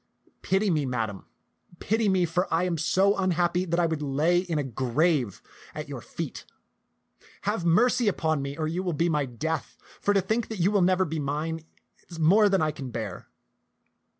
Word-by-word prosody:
Pity 195 +1 +1
me. 150 -4 0
Madam, 110 -6 -3 0.5
pity 220 +2 +1
me, 185 -2 +3
for 175 +2 -1
I 165 +2 +2
am 180 -2 0
so 190 +5 +2
unhappy 180 -1 +1
that 170 0 0
I 175 - +3
would 160 -2 -2
I - - -2
lay 155 +6 +2
in 175 -3 -2
a 145 - 0
grave 130 - 0 0.3
at - - -5
your - - -6
feet. - - -6 1.0
Have 205 -4 -1
mercy 235 +7 +3
upon 160 -6 +1
me, 140 +1 -5
or 155 -1 -1
you 170 +4 -2
will 180 -2 -2
be 165 +3 +1
my 150 -3 +1
death; 155 +6 -4 0.2
for 205 - +1
to 195 - +4
think 220 +4 -1
that 220 - -6
you 185 +3 +2
will 205 -2 +3
never 185 +1 +3
be 160 -1 -3
mine 150 +3 -2 0.5
is 170 - -9
more 200 +7 +5
than 195 -4 +2
I 155 - +1
can 135 -3 -7
bear." 110 -6 -6
170 Hz, 195 wpm, -27 LUFS, 150-185 Hz, 1.0 s, more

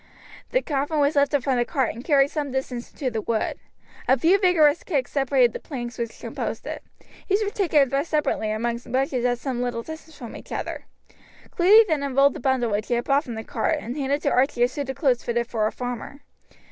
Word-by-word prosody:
The - - +1
coffin 290 +1 -1
was 290 +1 +2
lifted 280 -1 +2
from 265 -2 +1
the 240 - +3
cart, 260 0 -1
and 235 - -9
carried 280 -2 +3
some 300 -2 -2
short 265 - -8
distance 255 -2 -4
into 265 -4 -3
the 225 -1 -2
wood. 220 0 -2 0.5
A 260 - +5
few 345 +9 +4
vigorous 340 -5 +4
kicks 280 -8 -1
separated 265 -4 +3
the - - -5
planks 240 -4 -6
which 230 -1 -4
composed - - -5
it. - - -5 0.5
These 400 +3 +3
were 410 - -2
taken 345 -8 +3
and 270 - -4
thrust 280 +4 0
separately 300 -8 0
among 235 +2 -1
bushes 255 0 0
at 245 0 +2
some 250 -1 -3
little 245 -2 -2
distance 315 0 -10
from 235 -3 -8
each - - -12
other. - - -4 0.7
Cluny 415 +6 +6
then 310 -5 0
unrolled 275 0 +3
the - - -7
bundle 250 -3 +1
which 205 +1 -1
he 240 - +1
had 240 - 0
brought 280 +3 +2
from 235 - -6
the 220 - -5
cart, - - -1
and 240 +4 -6
handed 285 0 -1
to - - +1
Archie 255 -1 +2
a - - +5
suit 275 +1 -5
of 265 - -3
clothes 260 -6 +1
fitted 235 0 -1
for 220 -2 0
a - - -2
farmer. 245 +3 -6
265 Hz, 230 wpm, -24 LUFS, 240-290 Hz, 0.7 s, Cluny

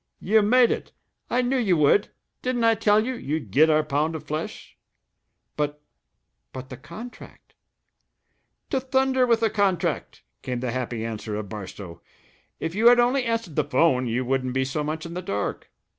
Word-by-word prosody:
"You 215 +3 +3
made 240 +3 +4
it! - - -4 0.4
I 250 +1 +1
knew 260 +2 +1
you 195 -8 +2
would. 150 +7 +4 0.3
Didn't 250 -2 -1
I 230 0 +5
tell 215 0 +3
you 260 - -2
we'd 150 - -4
get 155 +9 +5
our 155 0 +4
pound 150 +2 -1
of 155 - -6
flesh?" 155 +2 -6 0.8
"But 150 0 -2 0.7
but 130 0 -8
the 130 - -8
contract 220 - -11 0.6
" - - -49
"To 265 - +2
thunder 265 0 +2
with 230 -1 +3
the 225 -2 +2
contract!" 195 -4 -1 0.2
came 125 -1 -3
the 125 -1 -2
happy 120 -2 -3
answer 110 -1 -4
of 105 -2 -5
Barstow. 95 -4 -8 0.6
"If 165 +1 -3
you 220 +4 +3
had 245 0 +7
only 250 +2 +2
answered 230 -9 -2
the 150 - +2
'phone, 135 -3 +2
you 120 +2 -1
wouldn't 130 0 -1
be 130 0 +1
so 145 +3 -2
much 155 +2 -4
in 170 - -7
the 180 - -4
dark. 100 - -3
160 Hz, 180 wpm, -25 LUFS, -, 0.8 s, had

